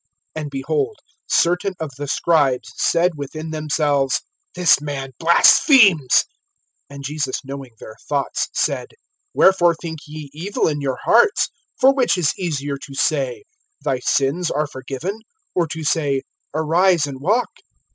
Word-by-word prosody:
(3)And, 155 Hz, -2 st, -4 dB
behold, 410 Hz, -, -2 dB, 0.3 s
certain 180 Hz, +3 st, +1 dB
of 160 Hz, -3 st, -4 dB
the 145 Hz, +2 st, -6 dB
scribes 140 Hz, -4 st, +1 dB
said 175 Hz, +1 st, +2 dB
within 155 Hz, +3 st, -6 dB
themselves: 150 Hz, -3 st, 0 dB, 0.3 s
This 180 Hz, -5 st, +4 dB
man 140 Hz, -2 st, -5 dB
blasphemes. 170 Hz, -, +5 dB, 0.7 s
(4)And 140 Hz, 0 st, -9 dB
Jesus 140 Hz, -2 st, -3 dB
knowing 135 Hz, -2 st, -8 dB
their 110 Hz, -, -11 dB
thoughts 140 Hz, -2 st, -1 dB
said: -, -, -2 dB, 0.4 s
Wherefore 175 Hz, -3 st, +4 dB
think 160 Hz, -1 st, -7 dB
ye 150 Hz, -2 st, -9 dB
evil 180 Hz, +7 st, -1 dB
in 150 Hz, -2 st, -2 dB
your 135 Hz, -2 st, -2 dB
hearts? 240 Hz, -, +4 dB, 0.3 s
(5)For 270 Hz, +1 st, +6 dB
which 250 Hz, -7 st, +2 dB
is 165 Hz, -5 st, +1 dB
easier, 145 Hz, -6 st, -3 dB
to 135 Hz, 0 st, -10 dB
say: 135 Hz, -4 st, 0 dB, 0.4 s
Thy 130 Hz, -, 0 dB
sins 140 Hz, +7 st, 0 dB
are 150 Hz, +1 st, 0 dB
forgiven; 140 Hz, +8 st, -6 dB, 0.3 s
or 175 Hz, -2 st, +1 dB
to 160 Hz, +1 st, -6 dB
say: 145 Hz, -3 st, 0 dB, 0.3 s
Arise, 165 Hz, +2 st, +2 dB
and 135 Hz, -2 st, -8 dB
walk? 215 Hz, -, +1 dB
155 Hz, 135 wpm, -20 LUFS, 140-175 Hz, 0.7 s, 5)For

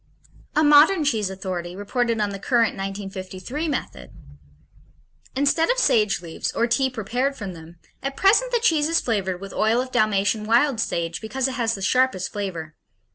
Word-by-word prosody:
A 310 Hz, -, +4 dB
modern 300 Hz, +4 st, +6 dB
cheese 220 Hz, -8 st, 0 dB
authority 185 Hz, -2 st, -5 dB
reported 230 Hz, +3 st, -1 dB
on 205 Hz, -1 st, 0 dB
the 195 Hz, -, -6 dB
current 230 Hz, +1 st, +2 dB
(1953) 195 Hz, -, -5 dB
method: 60 Hz, -, -4 dB, 1.3 s
Instead 285 Hz, +4 st, +2 dB
of -, -, +2 dB
sage 210 Hz, -, +2 dB
leaves, 165 Hz, -1 st, -4 dB
or 235 Hz, -, +1 dB
tea 265 Hz, +3 st, +1 dB
prepared 250 Hz, +4 st, -2 dB
from 200 Hz, -6 st, -6 dB
them, 165 Hz, +1 st, -13 dB, 0.2 s
at 275 Hz, 0 st, -4 dB
present 450 Hz, +6 st, +4 dB
the 485 Hz, -, +3 dB
cheese 320 Hz, -10 st, +2 dB
is 335 Hz, -, +3 dB
flavored 190 Hz, -6 st, -2 dB
with 195 Hz, +1 st, -9 dB
oil 220 Hz, +3 st, +2 dB
of 255 Hz, 0 st, -3 dB
Dalmatian 210 Hz, 0 st, +1 dB
wild 235 Hz, +3 st, +2 dB
sage 170 Hz, -5 st, -2 dB
because 260 Hz, +4 st, -2 dB
it -, -, -3 dB
has 230 Hz, -3 st, 0 dB
the 195 Hz, -, -7 dB
sharpest 250 Hz, -3 st, +1 dB
flavor. 175 Hz, -7 st, -5 dB
220 Hz, 170 wpm, -23 LUFS, 195-270 Hz, 1.3 s, modern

